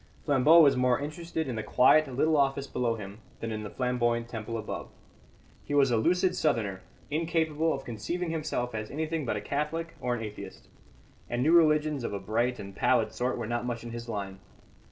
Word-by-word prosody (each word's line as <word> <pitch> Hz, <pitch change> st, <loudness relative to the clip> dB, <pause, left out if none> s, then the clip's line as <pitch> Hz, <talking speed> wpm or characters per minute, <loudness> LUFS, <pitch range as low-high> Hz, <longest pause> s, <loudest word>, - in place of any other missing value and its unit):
Flambeau 145 Hz, +3 st, +6 dB
was 140 Hz, -3 st, +6 dB
more 125 Hz, 0 st, +2 dB
interested 160 Hz, +2 st, -4 dB
in 125 Hz, -, -3 dB
the 110 Hz, -, -2 dB
quiet 130 Hz, +7 st, +4 dB
little 140 Hz, +5 st, +1 dB
office 140 Hz, -1 st, +2 dB
below 125 Hz, -4 st, -1 dB
him 100 Hz, -1 st, -9 dB, 0.2 s
than 115 Hz, -, -4 dB
in 110 Hz, -1 st, -3 dB
the 105 Hz, -, -6 dB
flamboyant 120 Hz, 0 st, 0 dB
temple 115 Hz, 0 st, -5 dB
above. 110 Hz, -, -5 dB, 0.7 s
He 145 Hz, -, -3 dB
was 135 Hz, -3 st, +4 dB
a 115 Hz, -, +3 dB
lucid 180 Hz, +8 st, +2 dB
Southerner, 110 Hz, -11 st, 0 dB, 0.3 s
incapable 160 Hz, 0 st, 0 dB
of 135 Hz, -, -4 dB
conceiving 165 Hz, -, -3 dB
himself 150 Hz, -7 st, -2 dB
as 110 Hz, -1 st, -4 dB
anything 155 Hz, -1 st, -3 dB
but -, -, 0 dB
a -, -, -4 dB
Catholic 165 Hz, +3 st, -3 dB
or 125 Hz, -1 st, 0 dB
an 115 Hz, -, -5 dB
atheist; 105 Hz, -1 st, -9 dB, 0.6 s
and 120 Hz, +1 st, -1 dB
new 155 Hz, -, +3 dB
religions 155 Hz, -4 st, +4 dB
of 115 Hz, -, -3 dB
a 100 Hz, -, -2 dB
bright 115 Hz, +5 st, 0 dB
and 100 Hz, -1 st, -9 dB
pallid -, -, +2 dB
sort 125 Hz, +1 st, -2 dB
were -, -, -3 dB
not 120 Hz, +1 st, -2 dB
much 120 Hz, -2 st, -4 dB
in 120 Hz, -, -7 dB
his 120 Hz, 0 st, -7 dB
line. 100 Hz, -3 st, -5 dB
125 Hz, 195 wpm, -29 LUFS, 115-155 Hz, 0.7 s, Flambeau